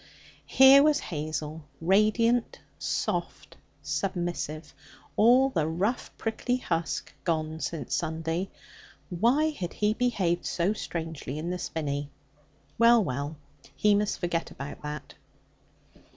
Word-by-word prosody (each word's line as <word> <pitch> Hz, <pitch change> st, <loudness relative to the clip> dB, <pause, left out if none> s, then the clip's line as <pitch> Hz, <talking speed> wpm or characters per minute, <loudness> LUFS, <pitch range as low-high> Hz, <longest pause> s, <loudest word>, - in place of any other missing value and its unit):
Here 265 Hz, +1 st, +8 dB
was 295 Hz, 0 st, +4 dB
Hazel, 155 Hz, 0 st, -4 dB, 0.2 s
radiant, 215 Hz, +6 st, +2 dB, 0.2 s
soft, 175 Hz, -1 st, -3 dB, 0.3 s
submissive, 155 Hz, -1 st, -3 dB, 0.4 s
all 250 Hz, +5 st, +5 dB
the 160 Hz, -9 st, 0 dB
rough 190 Hz, +9 st, -1 dB
prickly 245 Hz, +2 st, -1 dB
husk 165 Hz, -8 st, -3 dB
gone 160 Hz, -2 st, -1 dB
since 160 Hz, -1 st, -4 dB
Sunday. 165 Hz, +3 st, -2 dB, 0.6 s
Why 245 Hz, -, +3 dB
had 180 Hz, -, -5 dB
he 210 Hz, 0 st, +1 dB
behaved 195 Hz, -8 st, 0 dB
so 180 Hz, +4 st, +1 dB
strangely 160 Hz, -8 st, -5 dB
in 165 Hz, +3 st, -3 dB
the 180 Hz, -, -3 dB
Spinney? 145 Hz, -4 st, -3 dB, 0.7 s
Well, 230 Hz, -1 st, +6 dB
well, 145 Hz, +1 st, -3 dB, 0.4 s
he 210 Hz, -1 st, +4 dB
must 205 Hz, 0 st, +1 dB
forget 175 Hz, -2 st, -2 dB
about 140 Hz, +1 st, -8 dB
that. 150 Hz, 0 st, -6 dB
175 Hz, 110 wpm, -28 LUFS, 155-220 Hz, 0.7 s, Here